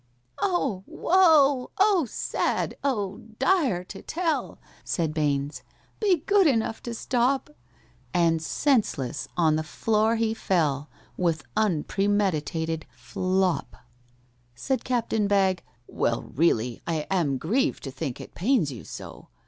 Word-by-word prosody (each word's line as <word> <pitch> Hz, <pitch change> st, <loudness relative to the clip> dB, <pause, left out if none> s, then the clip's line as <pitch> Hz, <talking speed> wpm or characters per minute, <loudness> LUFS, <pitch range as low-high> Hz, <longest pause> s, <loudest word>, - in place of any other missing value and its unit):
"Oh, 275 Hz, -, 0 dB
woe! 305 Hz, -8 st, +4 dB
oh, 390 Hz, -5 st, +4 dB
sad! -, -, -1 dB
oh, 205 Hz, -8 st, -1 dB, 0.2 s
dire 265 Hz, -, +2 dB
to 195 Hz, +2 st, -10 dB
tell!" 335 Hz, -1 st, -2 dB, 0.3 s
(Said 160 Hz, -3 st, -1 dB
BAINES). 145 Hz, -2 st, -1 dB, 0.4 s
"Be 370 Hz, -8 st, +2 dB
good 400 Hz, -3 st, +5 dB
enough 225 Hz, -4 st, 0 dB
to 235 Hz, -1 st, -5 dB
stop." 260 Hz, +4 st, 0 dB, 0.6 s
And 165 Hz, -2 st, +2 dB
senseless 160 Hz, -, 0 dB
on 160 Hz, -3 st, +3 dB
the 155 Hz, -, -1 dB
floor 220 Hz, +6 st, +1 dB
he 225 Hz, -1 st, +1 dB
fell, 155 Hz, -9 st, 0 dB, 0.3 s
With 165 Hz, -3 st, 0 dB
unpremeditated 180 Hz, -4 st, 0 dB
flop! 180 Hz, +7 st, -1 dB, 0.8 s
Said 245 Hz, -, -2 dB
CAPTAIN 225 Hz, -4 st, 0 dB
BAGG, 190 Hz, -3 st, +2 dB, 0.2 s
"Well, 115 Hz, -1 st, -1 dB
really 125 Hz, -6 st, +1 dB
I 160 Hz, -3 st, -1 dB
Am 160 Hz, -8 st, +1 dB
grieved 250 Hz, -, 0 dB
to 135 Hz, -, -5 dB
think 135 Hz, -2 st, -5 dB
it -, -, -10 dB
pains 195 Hz, -, +1 dB
you 120 Hz, -, -8 dB
so. -, -, -10 dB
195 Hz, 120 wpm, -26 LUFS, 155-260 Hz, 0.8 s, good